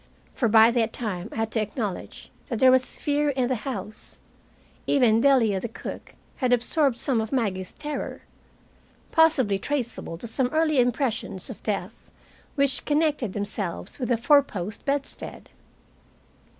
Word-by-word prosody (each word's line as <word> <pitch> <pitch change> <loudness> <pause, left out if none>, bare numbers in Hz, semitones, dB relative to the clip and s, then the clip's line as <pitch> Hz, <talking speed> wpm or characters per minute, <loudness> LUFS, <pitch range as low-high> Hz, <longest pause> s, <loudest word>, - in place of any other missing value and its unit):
For 240 - +1
by 220 +1 +7
that 230 -2 0
time 205 -4 -4
I - - -9
had 225 0 -1
to 220 - +1
acknowledge 210 -2 -5 0.2
that 240 - -3
there 260 +3 +6
was 255 0 +1
fear 295 0 +1
in 260 -3 0
the - - +2 0.2
house. 215 -4 -7 0.7
Even 235 -5 +4
Delia, 235 -8 +4
the 235 - -4
cook, 225 - -8 0.2
had 255 -2 0
absorbed 245 +2 +2
some 250 -4 0
of 220 - -5
Maggie's 195 -8 -1
terror; 295 -1 -5 0.9
possibly 275 -12 +3
traceable 240 -10 -3
to 175 - -7
some 245 +3 0
early 310 +1 +2
impressions 245 -4 0
of 230 - -11
death 205 0 -4 0.5
which 275 -3 +2
connected 295 -8 +1
them 205 -1 -2
selves 200 0 -5
with 250 - -2
a 240 - +3
four 285 +5 +5
post 205 -6 -6
bedstead. 280 0 -4
240 Hz, 150 wpm, -25 LUFS, 215-275 Hz, 0.9 s, by